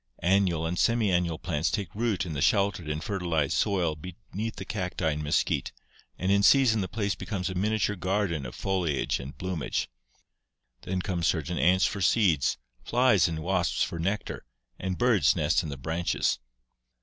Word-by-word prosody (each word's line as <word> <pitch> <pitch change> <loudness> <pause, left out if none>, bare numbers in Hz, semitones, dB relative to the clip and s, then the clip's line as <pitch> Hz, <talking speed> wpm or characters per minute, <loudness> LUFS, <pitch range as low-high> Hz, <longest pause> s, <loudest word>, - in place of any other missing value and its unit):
Annual 90 -3 +2
and 85 +2 -2
semiannual 90 -8 +2
plants 80 -2 0
take 100 -6 -3
root 105 -4 0
in 85 - -5
the 70 - -3
sheltered 95 0 +2
and 75 0 -3
fertilized 85 -8 -1
soil 90 -6 +1
beneath 100 +7 -6
the - - -7
cacti 90 -5 -2
and 75 +1 -3
mesquite 75 - 0 0.5
and 95 +1 0
in 100 0 +4
season 115 0 +5
the 95 - -2
place 100 +1 -1
becomes 95 -1 -4
a - - -4
miniature 105 +2 0
garden 95 -4 -1
of - - -9
foliage 90 -8 -1
and 65 +4 -8
bloomage. 90 -9 -2 0.9
Then 90 0 -3
come 90 -4 -2
certain 85 +1 0
ants 95 +2 +4
for 100 -4 -2
seeds, 90 - +3 0.3
flies 120 - +3
and 80 -1 -4
wasps 95 +3 +1
for 85 - -4
nectar, 95 +5 -2 0.4
and 95 -1 -3
birds 115 - +3
nest - - +2
in 80 - -6
the 70 - -5
branches. 80 +6 -1
90 Hz, 165 wpm, -28 LUFS, 80-100 Hz, 0.9 s, season